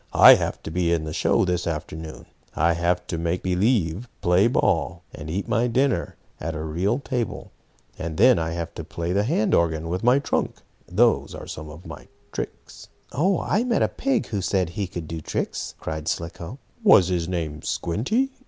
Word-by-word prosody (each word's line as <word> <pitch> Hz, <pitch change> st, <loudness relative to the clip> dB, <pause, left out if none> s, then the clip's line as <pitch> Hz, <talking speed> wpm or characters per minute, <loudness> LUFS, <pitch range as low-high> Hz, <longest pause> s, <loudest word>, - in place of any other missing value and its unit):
"I -, -, +11 dB
have -, -, -1 dB
to -, -, -6 dB
be 85 Hz, 0 st, +1 dB
in 85 Hz, -2 st, +1 dB
the 75 Hz, 0 st, -5 dB
show -, -, +2 dB
this 90 Hz, -1 st, -1 dB
afternoon. 80 Hz, 0 st, -5 dB, 0.3 s
I 85 Hz, +2 st, +3 dB
have 85 Hz, +1 st, 0 dB
to 85 Hz, -, -4 dB
make 85 Hz, +2 st, -1 dB
believe 95 Hz, +2 st, +1 dB
play 90 Hz, +5 st, +4 dB
ball, 85 Hz, -7 st, +1 dB
and 75 Hz, 0 st, -8 dB
eat 95 Hz, +5 st, -2 dB
my 120 Hz, +3 st, +2 dB
dinner 120 Hz, -, +1 dB, 0.2 s
at 80 Hz, +1 st, -4 dB
a 80 Hz, -, -4 dB
real 90 Hz, +9 st, 0 dB
table, 125 Hz, -6 st, -4 dB, 0.5 s
and 80 Hz, -1 st, -4 dB
then 125 Hz, +3 st, +6 dB
I 80 Hz, 0 st, -2 dB
have 85 Hz, -1 st, -4 dB
to -, -, -6 dB
play 85 Hz, +1 st, -3 dB
the 100 Hz, -, +3 dB
hand 110 Hz, -4 st, +1 dB
organ 80 Hz, -1 st, +1 dB
with 90 Hz, +4 st, -2 dB
my 125 Hz, +3 st, +5 dB
trunk. 140 Hz, -, -1 dB, 0.3 s
Those 115 Hz, +6 st, +2 dB
are -, -, -8 dB
some 75 Hz, 0 st, -7 dB
of 80 Hz, +3 st, -11 dB
my -, -, -10 dB, 0.2 s
tricks." -, -, -7 dB, 0.2 s
"Oh, 175 Hz, +8 st, +1 dB
I 215 Hz, -, +1 dB
met 245 Hz, -2 st, +1 dB
a -, -, +3 dB
pig 270 Hz, -4 st, 0 dB
who 100 Hz, -3 st, -2 dB
said 95 Hz, -2 st, 0 dB
he 100 Hz, +2 st, -3 dB
could 85 Hz, -3 st, -6 dB
do 80 Hz, 0 st, -5 dB
tricks!" -, -, -3 dB
cried 80 Hz, 0 st, -5 dB
Slicko. 85 Hz, +7 st, -4 dB, 0.3 s
"Was 95 Hz, -, +7 dB
his 85 Hz, -2 st, 0 dB
name 80 Hz, -5 st, -3 dB
Squinty?" 215 Hz, -, -1 dB
90 Hz, 190 wpm, -24 LUFS, 80-115 Hz, 0.5 s, I